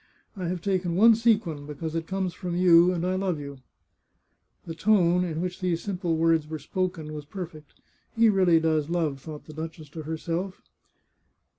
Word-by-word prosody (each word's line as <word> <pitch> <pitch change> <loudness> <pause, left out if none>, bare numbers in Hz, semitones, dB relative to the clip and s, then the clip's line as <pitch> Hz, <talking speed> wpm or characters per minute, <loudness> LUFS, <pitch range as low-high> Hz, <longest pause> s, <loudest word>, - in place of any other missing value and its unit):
I 185 -3 -4
have 175 0 -3
taken 185 -3 0
one 225 +5 +7
sequin, 210 -10 +1
because 150 +2 -5
it 165 0 -3
comes 190 -2 -2
from 180 -1 -5
you, 175 0 +6
and 175 -1 -2
I 185 - 0
love 185 -4 -1
you! 140 -1 -8 0.5
" - - -45
The 165 - -5
tone 180 -1 +3
in 165 -2 -3
which 180 0 -4
these 175 -2 -1
simple 180 -5 -1
words 165 -2 +2
were 155 0 -4
spoken 160 0 -3
was 150 -1 -6
perfect. 160 -3 -9 0.2
" - - -40
He 230 0 +6
really 185 -5 +4
does 160 -2 0
love! 160 -5 -1
" - - -24
thought 150 0 -9
the 155 - -11
duchess 160 -1 -7
to 160 +2 -7
herself. 165 +4 -4
170 Hz, 190 wpm, -26 LUFS, 160-185 Hz, 0.5 s, one